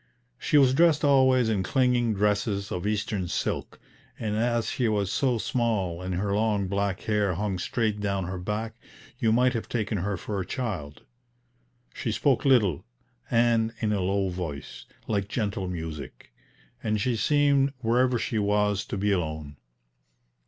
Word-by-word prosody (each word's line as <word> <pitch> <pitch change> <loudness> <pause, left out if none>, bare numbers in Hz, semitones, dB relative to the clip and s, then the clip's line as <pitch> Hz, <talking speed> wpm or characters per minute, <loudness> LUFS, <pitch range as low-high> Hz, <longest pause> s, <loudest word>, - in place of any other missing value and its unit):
She 155 - +2
was 135 -3 +5
dressed 160 0 +4
always 130 -3 +4
in 105 -4 +1
clinging 120 +1 +2
dresses 100 0 0
of 90 +2 -2
Eastern 105 -3 -1
silk, - - -3 0.4
and 105 -2 -2
as 115 +1 0
she 125 - 0
was 100 -3 0
so 130 -4 +1
small, 105 -8 -1
and 90 0 -3
her 100 +2 -1
long 105 -2 +1
black 100 0 -1
hair 105 -4 0
hung 95 0 -2
straight 110 +1 -1
down 100 -2 -1
her 90 +1 -4
back, 105 +4 -3 0.5
you 115 - +2
might 125 +2 +3
have 115 - -4
taken 110 -3 -1
her 100 +2 -2
for 100 +2 -4
a - - -1
child. 95 - -5 0.9
She 115 - -3
spoke 130 +3 +1
little, 110 - +3 0.5
and 115 -1 +2
in 105 -2 0
a 100 - 0
low 95 +1 0
voice, 85 -6 -6 0.2
like 100 -3 -1
gentle 100 -3 -2
music; 80 -4 -7 0.5
and 110 -1 0
she 120 +3 0
seemed, 140 +2 +3
wherever 125 +2 +2
she 110 -1 -1
was, 105 -1 +1
to - - -4
be 100 +1 +1
alone. 75 -5 -2
105 Hz, 160 wpm, -27 LUFS, 95-120 Hz, 0.9 s, was